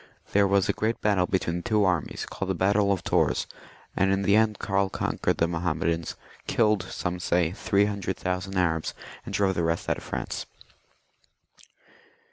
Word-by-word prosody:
There 100 0 +4
was 100 -1 +3
a - - +2
great 110 +2 -1
battle 100 -4 +2
between 90 -2 0
the - - -4
two 105 +1 +2
armies, 90 -4 -1
called 95 - -5
the 95 - +1
battle 100 +3 +2
of 95 - -1
Tours, - - +1 0.5
and 95 0 +2
in 95 0 +1
the 100 +1 +4
end 110 -1 +3
Karl 100 0 0
conquered - - -1
the 85 - +2
Mahommedans, 85 -1 -1 0.3
killed, 105 -3 +3
some 90 0 -4
say, 85 -2 +1
three 100 +1 +2
hun* 105 -1 -3
dred 95 -1 -3
thousand 90 +1 -3
Arabs, 80 -3 0 0.3
and - - -7
drove 100 -1 +2
the 85 - -1
rest 85 +1 -1
out - - 0
of - - -14
France. - - -4
95 Hz, 180 wpm, -26 LUFS, 85-100 Hz, 0.5 s, There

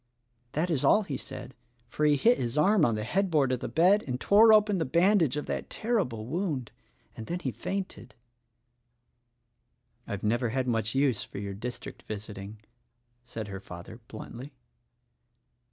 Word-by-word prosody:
"That 170 +4 0
is 145 -5 0
all 215 - +5
he 145 -8 -4
said, 130 - -8 0.3
for 150 - -1
he 150 -1 +5
hit 235 - +3
his 120 +3 -2
arm 185 +2 +4
on 115 - +1
the 105 - -3
head 190 - 0
board 145 -6 +2
of 125 - 0
the - - -4
bed 180 - +4
and 125 -1 -2
tore 215 +7 +6
open 210 -3 +4
the - - +1
bandage 170 -1 +3
of 150 - -3
that - - -4
ter 235 +2 -1
rible 115 -3 -7
wound, 150 - -3 0.4
and 110 - -8
then 175 - -2
he 130 - -2
fainted." 190 - -5 1.9
"I've 100 -1 -5
never 120 +3 +1
had 130 +2 -1
much 115 -1 0
use 135 -5 +2
for - - -10
your 100 0 -4
district 120 +5 -7
visiting," 105 0 -7 0.6
said 115 -3 -6
her 95 -1 -6
father 90 +4 -10
bluntly. 125 +5 -9
130 Hz, 170 wpm, -28 LUFS, 110-175 Hz, 1.9 s, tore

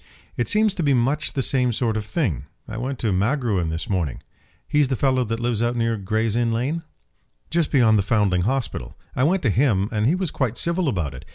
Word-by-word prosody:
"It 120 - -1
seems 215 - +3
to 185 - -3
be 140 -4 +3
much 135 +5 0
the 135 - 0
same 125 -2 +2
sort 115 -1 -1
of 110 - -1
thing. 100 - -2 0.2
I 110 - -7
went 130 +3 -3
to 110 -3 -1
Magruin 105 - 0
this 80 +1 -4
morning." 85 -9 -2 0.4
"He's 150 -2 +3
the 130 - 0
fellow 130 0 +2
that 115 +1 -3
lives 120 -2 -1
out 120 +1 +1
near 115 -1 +1
Gray's 110 +2 -1
Inn 120 -1 +1
Lane?" 130 +9 -1 0.7
"Just 170 -1 +1
beyond 115 -6 +4
the 100 - -2
Foundling 100 -5 +2
Hospital. 115 - -2 0.2
I 125 - +1
went 180 +5 +2
to 115 - +3
him, 105 -4 +2
and 110 0 +1
he 160 - +3
was 185 -3 -2
quite 125 -4 -1
civil 170 -1 +1
about 85 - -2
it. 65 +2 -10
120 Hz, 220 wpm, -23 LUFS, 105-135 Hz, 0.7 s, beyond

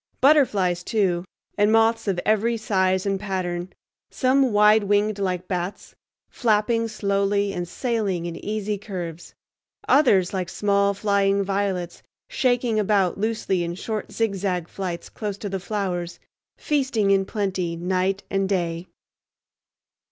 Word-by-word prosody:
Butterflies, 210 - +3
too, 185 -5 0 0.3
and 205 +1 +4
moths 225 0 +3
of 190 -3 0
every 220 +2 +2
size 190 -3 +1
and 195 -1 0
pattern; 185 -3 -3 0.4
some 260 -1 +2
wide 210 0 +5
winged 205 +1 +1
like 185 -2 -2
bats, 180 +1 -4 0.3
flapping 230 0 +1
slowly 200 -1 0
and 175 -2 -3
sailing 205 -6 -2
in 170 -1 -4
easy 210 -1 -2
curves; 175 -5 -7 0.5
others 205 -12 +4
like 185 -2 -2
small 200 0 +1
flying 200 -1 +2
violets 195 -3 -2 0.3
shaking 245 - +1
about 195 -3 +1
loosely 210 -4 0
in 170 0 -4
short 215 +3 -4
zigzag 195 -5 -1
flights 180 -3 -5
close 205 -3 -5
to 205 - -5
the 195 0 -3
flowers, 180 -3 -3 0.4
feasting 260 -9 +1
in 195 -1 +4
plenty 190 -4 -2
night 185 +3 -1
and 195 -1 -1
day. 170 -2 -1
200 Hz, 130 wpm, -23 LUFS, 185-215 Hz, 0.5 s, wide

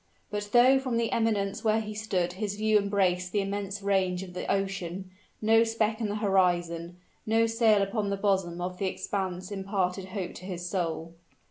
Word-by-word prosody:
But 205 0 -3
though 255 +3 +6
from 255 -3 -1
the 230 -1 0
eminence 210 -4 0
where 220 0 +3
he 215 -1 -5
stood 190 -5 -1
his 205 +1 -3
view 215 0 +3
embraced 185 -3 +1
the 205 - +1
immense 200 0 -4
range 190 -2 +1
of 180 -1 -10
the 180 - -3
ocean, 190 -1 -2 0.3
no 225 +1 +5
speck 225 0 0
in 215 - 0
the 205 - -2
horizon 175 -4 +1 0.3
no 225 +1 +4
sail 225 -3 +3
upon 205 +1 -1
the 200 - -1
bosom 190 -4 0
of 180 0 -4
the 195 - 0
expanse 185 -1 -3
imparted 195 -1 -1
hope 185 -2 -5
to 185 - -11
his 180 -2 -5
soul. 165 -2 -2
195 Hz, 185 wpm, -28 LUFS, 180-215 Hz, 0.3 s, though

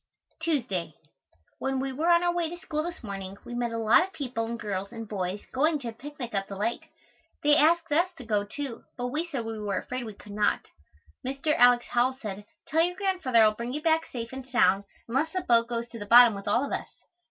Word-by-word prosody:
Tuesday. 235 - -1 0.6
When 265 0 -1
we 270 0 -2
were 310 +6 0
on 340 0 +5
our 350 0 +2
way 345 -2 0
to 345 - -7
school 305 -4 -3
this 340 -2 -6
morning 195 -2 -6
we 240 - -7
met 240 -1 -1
a 230 - -3
lot 225 +7 +5
of 380 +2 -3
people 250 -7 -3
and 235 0 -4
girls 200 -2 -3
and 225 -2 -7
boys 195 -1 -3
going 305 +4 +2
to 250 -5 -5
a - - -7
picnic 275 0 -8
up 195 -1 -1
the 200 - -7
lake. 220 +4 -2 0.5
They 295 0 +6
asked 330 +2 +3
us 340 +5 +3
to 250 - -9
go, 210 -2 +1
too, 250 +4 -6
but 245 0 -2
we 315 +7 -2
said 270 -8 -4
we 225 -1 -4
were 205 -2 -2
afraid 250 +5 -4
we 215 -2 -8
could 205 - -13
not. 210 0 +1 0.6
Mr. 275 +4 0
Alex. 245 0 +6
Howell 245 +2 +2
said, 205 -4 -6 0.2
"Tell 320 +2 +2
your 355 +2 +1
Grandfather 360 - +3
I - - +7
will - - -4
bring 235 +3 -5
you 300 - -3
back 325 -1 +2
safe 235 -1 -6
and 265 0 -6
sound 200 -6 +3 0.2
unless 275 +7 0
the 370 - 0
boat 230 -4 +3
goes 235 0 -3
to 230 - -9
the 205 - -7
bottom 240 0 +8
with 200 0 -8
all 235 +7 +2
of - - -7
us." - - -3
245 Hz, 240 wpm, -28 LUFS, 215-300 Hz, 0.6 s, bottom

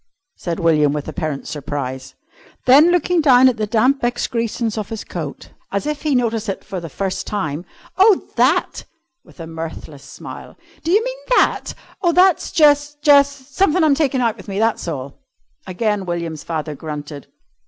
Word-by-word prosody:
said 170 0 -4
William 155 -4 +3
with 150 -1 -4
apparent 155 -5 -4
surprise. 135 -3 -5 0.5
Then, 285 +6 +7
looking 355 0 +2
down 260 -3 +6
at 250 -3 +1
the 215 -1 -2
damp 250 +6 +2
excrescence 235 -2 -1
of 215 -3 -4
his 225 -2 -5
coat, 155 -5 -7 0.2
as 200 +5 -2
if 300 -1 -3
he 300 -3 0
noticed 225 -3 0
it 195 - -4
for 195 -3 -5
the 165 -1 -8
first 190 +5 -3
time, 160 -5 -3 0.3
"Oh, 395 0 +5
that!" 265 +9 +1 0.4
with - - -20
a 165 - -6
mirthless 160 -3 -8
smile. - - -10 0.3
"Do 325 - -3
you 420 +4 +4
mean - - -5 0.2
that? - - +1 0.3
Oh, 345 -2 +2
that's 365 0 +3
jus' 295 -2 +3
jus' 285 -2 +6
somethin' 295 +6 0
I'm 305 -2 +4
takin' 275 -3 +1
out 230 -2 0
with 200 - -13
me, 195 -1 -4
that's 225 -3 0
all." 140 -4 -6 0.5
Again 200 +1 -1
William's 170 -3 -4
father 155 -2 -4
grunted. 145 -1 -7
220 Hz, 170 wpm, -19 LUFS, -, 0.5 s, Then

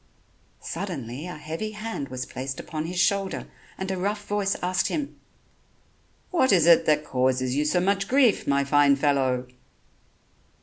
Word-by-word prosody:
Suddenly 160 - -5
a 180 - -7
heavy 165 +8 -5
hand 215 -10 -5
was 130 0 -4
placed 130 +1 -6
upon 155 -1 -5
his 175 +1 -3
shoulder, 195 0 0 0.3
and 190 0 -3
a 190 - -2
rough 205 +2 -2
voice 205 -1 0
asked 185 +1 +1
him: 295 -3 -3 1.2
"What 295 -8 +3
is 175 -5 +5
it 170 -1 +6
that 150 -1 +3
causes 130 0 0
you 150 +1 +1
so 180 +4 +2
much 195 +2 +1
grief, 260 -5 +3
my 140 0 +2
fine 140 0 +4
fellow?" 135 -3 +1
165 Hz, 150 wpm, -25 LUFS, 140-200 Hz, 1.2 s, it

